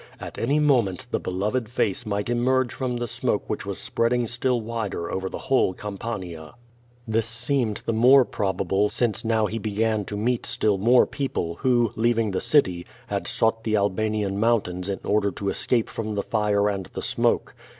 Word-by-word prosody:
At - - -8
any 140 +6 +1
moment 125 - +2
the - - 0
beloved 105 +6 -2
face 110 -1 -1
might 100 0 -2
emerge 125 +1 +1
from 125 -3 -2
the 120 0 -3
smoke - - -1
which - - -4
was - - -3
spreading 120 +1 0
still 120 +2 0
wider 110 -6 -4
over 95 0 -2
the - - -6
whole 130 -8 +1
Campania. 95 -6 -6 0.5
This 110 0 +1
seemed 115 -1 0
the 115 - 0
more 125 +4 +6
probable 100 0 0
since 115 0 0
now 110 -1 +2
he 110 +2 -3
began 110 +1 0
to 105 - -5
meet 120 +3 -1
still 105 -3 +1
more 120 +5 +5
people 85 - -3
who, 120 -4 +3
leaving 115 -1 +1
the 95 - -1
city, 90 - +2 0.3
had - - -2
sought 115 0 0
the 110 -1 0
Al 100 -1 +2
banian 105 0 -1
mountains 100 -5 0
in 100 - -2
order 105 -1 +1
to 100 +1 -3
escape 120 +2 +1
from 110 -1 -4
the 100 - -1
fire 105 -2 +1
and 100 -3 -2
the - - -5
smoke. - - +1
110 Hz, 180 wpm, -24 LUFS, 100-120 Hz, 0.5 s, more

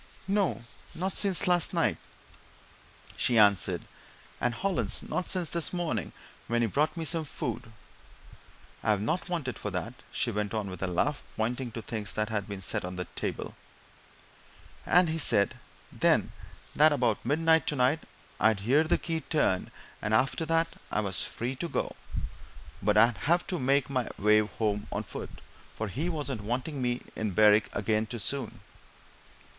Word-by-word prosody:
"No 195 - +1 0.3
not 190 +3 -2
since 195 -3 +3
last 175 -2 +3
night," - - +2 1.2
she 120 - +2
answered. 100 -3 +4 0.6
"And 120 - 0
Hollins 195 +4 -1
not 180 - -3
since 180 -4 -1
this 170 -2 -1
morning 175 -2 -2 0.4
when 120 0 +1
he - - +2
brought 150 - 0
me 165 - -2
some 165 0 +1
food 120 -6 -5 1.1
I've 105 -2 +2
not 170 - -1
wanted 155 -8 -3
for 105 - -3
that," 100 +5 -4 0.2
she 120 - -1
went 105 0 -2
on, 105 -3 -2
with 90 - -8
a 95 - 0
laugh, 95 +12 0 0.2
pointing 120 +3 -1
to 115 - -6
things 105 -4 -3
that 105 0 0
had 105 -3 -2
been 100 -2 -6
set - - 0
on 90 +1 -5
the 90 0 -3
table. - - -4 1.3
"And 180 0 +6
he 160 +1 -1
said, 100 -9 +4 0.4
then, - - +2 0.4
that 155 +1 +6
about 120 -7 +1
midnight, 160 +2 +3
tonight, 135 +2 +2 0.4
I'd 110 -1 +3
hear 135 +9 +4
the 160 - +2
key 165 -1 -3
turned, 135 - +1 0.3
and 110 +1 +1
after 135 +7 +1
that 165 +1 +2 0.2
I 105 - +1
was 100 -4 -1
free 125 +3 -4
to 170 - -3
go, - - -2 0.9
but 105 +1 +2
I'd 115 +1 +5
have 175 +1 +3
to 180 - -3
make 135 +2 +2
my 130 -3 -1
way 105 +1 +5
home 105 -1 -1
on - - -2
foot, - - -7 0.5
for 110 -1 -3
he 150 - -2
wasn't 145 -8 -2
wanting 130 +6 -3
me 120 -1 +1
to - - -15
be - - -19
in 110 -2 0
Berwick 105 +2 +5
again 110 +1 +1
too 120 - -5
soon." 130 +2 -4
120 Hz, 170 wpm, -29 LUFS, 105-160 Hz, 1.3 s, And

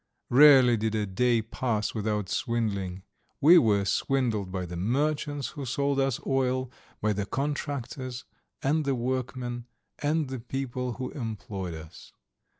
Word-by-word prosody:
Rarely 130 -2 +8
did 110 0 -1
a 105 -1 0
day 115 +4 +1
pass 110 -2 -2
without 105 -2 -1
swindling. 100 -5 -2 0.4
We 165 +4 +8
were 105 -7 +2
swindled 110 -3 0
by 90 -1 -3
the 85 0 -7
merchants 145 - -1
who 145 - -7
sold 140 +2 0
us 135 -3 +1
oil, 130 -1 0 0.3
by 110 0 +2
the 100 0 -3
contractors 135 -2 -3 0.4
and 150 +3 +2
the 140 -2 0
workmen 125 -1 -3 0.3
and 150 0 +1
the 130 -1 -5
people 125 0 -3
who 130 +1 -5
employed 105 - -5
us. 80 0 -12
125 Hz, 140 wpm, -28 LUFS, 105-135 Hz, 0.4 s, Rarely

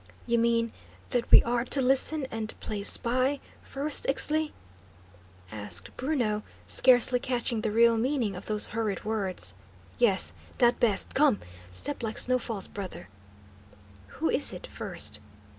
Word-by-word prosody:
"You 235 -1 0
mean 230 0 0 0.4
that 245 -1 -2
we - - +7
are 235 0 -1
to 275 - +3
listen 270 +3 +2
and 220 -1 -4
play 210 -2 -6
spy, 255 +6 +2 0.2
first, 285 +2 +3
Ixtli?" 305 +2 +1 1.0
asked 100 -3 -3
Bruno, 245 -7 -2 0.2
scarcely 250 -1 +4
catching 240 -3 -2
the 220 - -1
real 230 +1 +3
meaning 235 -4 -1
of 180 - -10
those 210 -1 +1
hurried 215 -4 -3
words. 190 - -3 0.5
"Yes. 205 -6 +4 0.2
Dat 240 0 +2
best. 215 -5 +2
Come; 275 -6 +2 0.3
step 265 - -4
like 225 -1 -5
snow 255 0 +2
falls, 220 -5 -3
brother." 185 - -9 1.1
"Who - - -1
is - - +3
it, - - -8
first?" 105 0 -2
235 Hz, 140 wpm, -27 LUFS, 210-255 Hz, 1.1 s, we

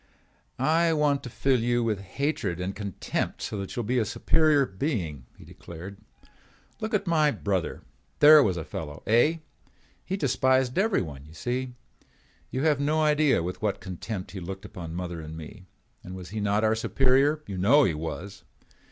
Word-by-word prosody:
"I 165 +5 +3
want 150 -2 +2
to 125 - -7
fill 130 +1 +1
you 120 +1 +1
with 110 -4 0
hatred 100 - -2
and 95 +2 -3
contempt 100 -3 -3
so 105 - -4
that 95 - -6
you 120 - -2
will - - -7
be 125 +1 +2
a - - +2
superior 150 +6 +3
being," 95 - -3
he - - -14
declared. 90 +4 -10 0.8
"Look 220 0 -1
at 200 - 0
my 155 -4 +3
brother. 100 - -2 0.3
There 150 +1 +9
was 95 -9 +1
a 80 - -3
fellow, 75 -2 -7
eh? 120 +9 +4 0.7
He 190 - -3
despised 130 -2 +2
everyone, 80 - -1
you 80 - -15
see. 125 +3 -3 0.7
You 130 - -2
have 150 -3 +3
no 155 +2 +1
idea 150 - +3
with 90 +2 -5
what 105 -2 -1
contempt 95 +1 -6
he 100 - -6
looked 95 +3 -7
upon 85 -4 -8
mother 90 -2 -4
and 80 0 -8
me. 90 +4 -11 0.4
And 90 - -8
was 90 -2 -8
he 110 +2 -4
not 105 +1 +1
our 110 0 +3
superior? 135 +6 +2
You 95 -2 -5
know 135 +11 +5
he 90 - +2
was. 85 +6 -6
110 Hz, 180 wpm, -27 LUFS, 90-145 Hz, 0.8 s, There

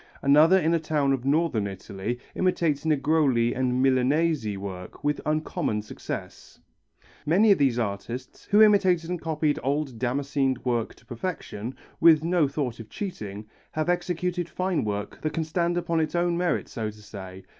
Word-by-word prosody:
Another 150 +6 +6
in 165 -2 +2
a 165 - +3
town 150 -3 +1
of 130 -1 -3
Northern 140 -8 +1
Italy, 100 +4 -5 0.2
imitates 165 -5 0
Negroli 145 -5 +2
and 130 0 0
Milanese 135 -3 +2
work 95 -2 -8
with 145 0 0
uncommon 155 - -1
success. 105 - -8 0.6
Many 200 +8 +4
of 195 - +4
these 135 -4 +3
artists, 115 +3 -4
who 210 +2 +6
imitated 185 -5 +4
and 180 -2 -3
copied 155 -2 0
old 140 -2 -2
damascened 135 +1 -1
work 120 -3 -1
to - - -23
perfection, 120 - -5 0.2
with 160 -2 +6
no 170 -3 +2
thought 135 -5 -3
of 110 -1 -9
cheating, 105 - -6 0.3
have 155 +2 -1
executed 175 0 -1
fine 185 -1 -1
work 105 -1 -4
that 155 - -2
can 165 - -1
stand 170 +2 0
upon 170 -1 0
its 155 +1 -1
own 175 0 +1
merits 175 0 -1
so 110 -3 -3
to 105 0 -12
say. 95 -2 -9
145 Hz, 160 wpm, -26 LUFS, 120-170 Hz, 0.6 s, Another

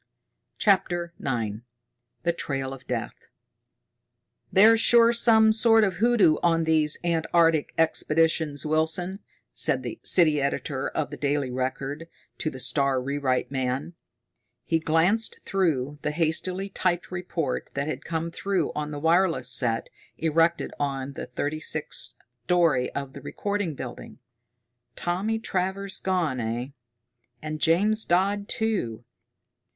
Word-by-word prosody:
CHAPTER 175 -4 +1
IX 115 -5 -2 0.6
The 170 0 +1
Trail 135 -4 -3
of 130 -1 -12
Death 120 -3 -5 1.2
"There's 220 +4 +6
sure 235 0 +5
some 220 -2 +5
sort 225 0 +5
of 190 -4 0
hoodoo 220 -7 +4
on 165 -1 +2
these 155 -2 +2
Antarctic 165 -2 +2
expeditions, 160 -2 +1
Wilson," 160 +5 0 0.3
said - - +1
the - - -6
city 155 -5 +4
editor 140 -1 -2
of 150 -2 -3
The 145 - -7
Daily 140 -2 -1
Record 135 +5 -4 0.3
to 155 - -1
the 130 - -9
star 130 +1 +1
rewrite 135 -1 -1
man. 130 +4 -2 0.7
He 165 - 0
glanced 165 +8 +1
through 150 -7 -1
the - - -1
hastily 175 +5 -1
typed 180 -2 -1
report 175 -6 -3
that 140 +1 -2
had 155 - -4
come 165 0 -3
through 190 -3 -1
on 150 0 -3
the 150 - -6
wireless 165 -4 +2
set 120 -3 +2 0.3
erected 165 +1 +1
on 140 -1 -3
the - - -7
thirty 150 +2 -3
sixth - - -1 0.3
story 165 -7 +2
of 140 -1 -4
the - - -10
Record 200 -6 -3
Building. 130 -2 -8 0.8
"Tommy 195 +6 -1
Travers 190 -1 -3
gone, 175 -9 -1
eh? 120 +3 -3 0.7
And 155 +1 -6
James 210 +7 +3
Dodd, 200 +3 +1
too! 195 - -2
160 Hz, 125 wpm, -25 LUFS, 140-185 Hz, 1.2 s, There's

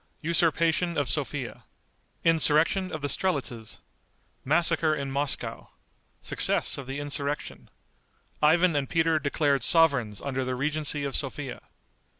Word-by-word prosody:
Usurpation 165 +1 +1
of 145 -3 0
Sophia. - - -3 0.6
Insurrection 165 +3 +3
of 155 -2 -6
the - - 0
Strelitzes. 130 - -2 0.6
Massacre 160 +1 +2
in 140 -2 -5
Moscow. 140 +1 -3 0.5
Success - - +2
of 135 - -8
the 135 +2 -4
Insurrection. 145 0 -3 0.7
Ivan 165 +2 +4
and 140 -2 -1
Peter 160 -1 +2
Declared 140 -1 0
Sovereigns 125 - +2
under 135 -1 -3
the 130 0 -3
Regency 150 +2 -1
of 140 -1 -3
Sophia. 135 -1 -4
145 Hz, 120 wpm, -26 LUFS, 140-165 Hz, 0.7 s, Ivan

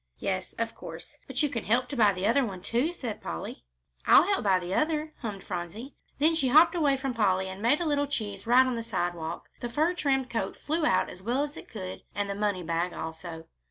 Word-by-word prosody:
"Yes, 185 -1 -2
of 230 0 -3
course. - - -9
But - - -1
you 295 - +2
can 230 -5 -3
help 245 +4 +2
to 285 - -4
buy 215 -5 +5
the 185 0 -3
other, 235 +6 +4 0.2
too," 240 - 0
said 250 -11 -5
Polly. 80 -6 -6 0.4
"I'll - - +8
help 400 +2 +2
to - - -3
buy 195 -2 +4
the 180 0 -4
other," 310 +2 0
hummed 205 -6 -5
Phronsie. 195 - -5 0.2
Then 310 +3 +4
she 320 -5 +1
hopped 310 +8 +7
away 295 -6 +2
from 265 -1 -2
Polly 190 -4 +2
and 190 +1 -7
made 240 +7 +3
a 345 - -1
little 285 -2 +1
cheese 210 -6 -4
right 250 +2 +7
on 255 - 0
the 230 - -2
sidewalk. 175 -7 -3
The 240 - -4
fur 310 +8 +2
trimmed 270 -6 +1
coat 210 -5 -2
flew 310 +1 0
out - - +2
as 180 - -11
well 245 +7 0
as 295 +1 -5
it - - -10
could, 185 -4 -6
and 205 0 -1
the 200 - -2
money 200 -3 -1
bag 170 +2 -1
also. 160 0 -6
230 Hz, 230 wpm, -28 LUFS, 190-285 Hz, 0.4 s, I'll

